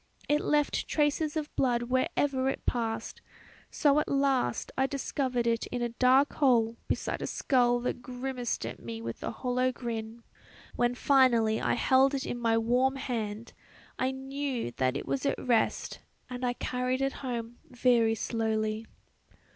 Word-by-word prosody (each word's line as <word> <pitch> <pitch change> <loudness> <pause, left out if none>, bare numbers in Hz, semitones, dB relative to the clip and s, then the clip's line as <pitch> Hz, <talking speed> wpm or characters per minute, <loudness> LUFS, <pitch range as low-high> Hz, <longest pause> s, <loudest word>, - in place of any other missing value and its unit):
It 295 0 +2
left 295 -1 +1
traces 300 +1 +1
of 305 -1 -4
blood 240 -3 +1
wherever 260 +2 +1
it - - -4
passed, 230 -2 -2 0.5
so 290 0 +3
at - - -1
last 275 - +1
I 265 0 +2
discovered 265 -3 -1
it 230 -1 0
in 245 -1 -3
a 240 - 0
dark 255 +4 +3
hole 235 -5 +3
beside - - -2
a - - -2
skull 245 -3 +2
that 245 0 -3
grimaced 250 - -3
at 115 - -6
me 115 -1 -6
with 115 0 -6
a - - -3
hollow 250 +2 0
grin: 230 -2 -6 0.5
when 240 0 +1
finally 245 -5 +3
I - - +1
held 265 +3 +4
it 270 - -3
in 240 - -4
my 230 -1 +2
warm 250 +4 +2
hand 225 -4 -4 0.5
I 255 - +1
knew 265 - -3
that 130 0 +1
it - - -6
was 135 -1 -2
at - - 0
rest, 235 -3 0 0.3
and 250 0 -5
I 245 -1 +1
carried 255 +1 -2
it 270 - 0
home 240 -2 -4
very 240 -3 +3
slowly. 220 -1 -1
245 Hz, 160 wpm, -29 LUFS, 230-265 Hz, 0.5 s, held